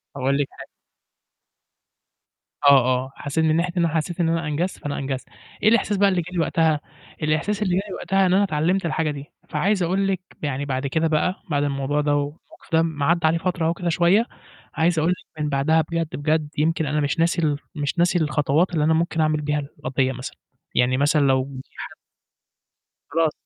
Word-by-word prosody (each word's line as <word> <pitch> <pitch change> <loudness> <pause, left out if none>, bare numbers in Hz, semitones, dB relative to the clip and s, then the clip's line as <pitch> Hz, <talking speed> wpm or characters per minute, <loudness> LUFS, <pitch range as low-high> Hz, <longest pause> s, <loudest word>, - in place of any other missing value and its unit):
أقول 135 +1 +1
لِك 145 -1 0
حاجة - - -11 2.0
آه، - - +9 0.4
آه، 135 - -13
حسيت 150 +3 -1
من 155 0 +3
ناحية 170 +1 0
إن 170 - +3
أنا 165 -1 -1
حسيت 165 +3 -2
إن 165 -2 +2
أنا 165 -1 -1
أنجزت، 170 +5 -2
فأنا 145 -1 -4
أنجزت. 135 -1 -4 0.4
إيه 215 - +6
الإحساس 215 -2 +2
بقى 200 0 +4
اللي 185 -2 +1
جا 170 +2 -9
لي 180 - -2
وقتها، 160 -1 +2 0.4
الإحساس 160 +8 0
اللي 185 -4 +1
جا 190 - +2
لي - - -5
وقتها 195 0 +1
إن 180 - +2
أنا 200 +2 +4
اتعلمت 175 +2 0
الحاجة 160 -1 0
دي، 140 -1 -7 0.2
فعايز 190 +5 +1
أقول 190 +3 +1
لِك 190 -2 0 0.2
يعني 145 -1 -2
بَعد 135 0 -2
كده 160 +4 +1
بقى، 160 +4 0
بَعد 145 -2 +1
الموضوع 140 +1 0
ده، 145 0 +1
والمَوقِف 145 +2 -6
ده 160 - +5
لمّا 160 -3 0
عدّى 170 0 +3
عليه 165 - +2
فترة 175 -1 -1
أهو 165 - +2
كده 175 0 -3
شوية، 175 +7 +3 0.5
عايز 165 0 +2
أقول 165 +3 +2
لِك 170 -3 -7
من 150 - -1
بَعدها 150 +3 +2
بجد، 165 -2 -2
بجد 150 +1 0
يمكن 160 +2 +1
أنا 150 +1 0
مش 145 +3 -1
ناسي 170 +1 +2
ال 150 -3 +1 0.2
مش 145 +3 -2
ناسي 175 +1 +3
الخطوات 150 +2 +1
اللي 155 -3 +1
أنا 160 +1 +3
ممكن 165 0 0
أعمل 155 -1 +1
بيها 150 0 0
القضية 135 -2 -2
مثلًا. 125 0 -7 0.4
يعني 125 +1 +3
مثلًا 145 +2 +3
لو 135 -2 +3 0.2
في - - -37
حد - - -8 1.2
خلاص 165 -1 +2
160 Hz, 205 wpm, -23 LUFS, 145-170 Hz, 2.0 s, آه